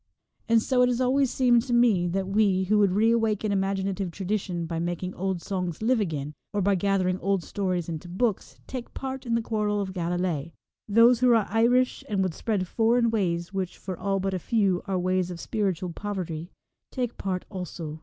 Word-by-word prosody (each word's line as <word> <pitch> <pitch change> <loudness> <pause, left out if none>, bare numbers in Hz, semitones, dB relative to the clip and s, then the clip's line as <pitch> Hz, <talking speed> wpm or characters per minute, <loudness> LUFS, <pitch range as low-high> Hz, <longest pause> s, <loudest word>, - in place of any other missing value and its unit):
And 225 -1 +4
so 255 -2 +2
it 250 - +5
has 245 -1 0
always 260 +1 +2
seemed 245 -2 +4
to 245 +1 -3
me 225 -7 +4
that 190 +3 -1
233 190 +1 -6
we, 200 -3 +3
who 210 +3 +2
would 200 -3 +3
re 220 +3 +4
awaken 220 -2 +1
imaginative 195 -1 -1
tradition 185 -1 -3
by 165 0 -3
making 175 +2 -3
old 190 -2 -3
songs 180 -1 -3
live 245 +1 +3
again, 150 -7 -3 0.2
or 205 - 0
by 200 +1 +3
gathering 185 -1 +1
old 195 -2 0
stories 185 -4 -2
into 165 +1 -6
books, 200 +3 -1
take 255 -2 -7
part 265 -1 -5
in 230 - +1
the 230 - 0
quarrel 210 -2 0
of 190 -2 -3
Galilee. 175 -3 -2 0.3
Those 230 +3 +5
who 250 0 +4
are 220 -3 +3
Irish 245 +3 +2
and 200 -2 +1
would 185 -3 -1
spread 200 -1 -1
foreign 230 +3 +2
ways, 175 -4 -1
which, 190 -2 -3
for 185 -1 -5
all 195 +2 -1
but 195 0 -1
a 185 - -1
few, 195 -1 +1
are 190 -1 0
ways 185 0 0
of 175 -2 -6
spiritual 185 -5 -2
poverty, 175 -5 -4 0.4
take 245 -3 -3
part 185 -2 -2
also. 170 -5 -6
195 Hz, 200 wpm, -26 LUFS, 180-225 Hz, 0.4 s, it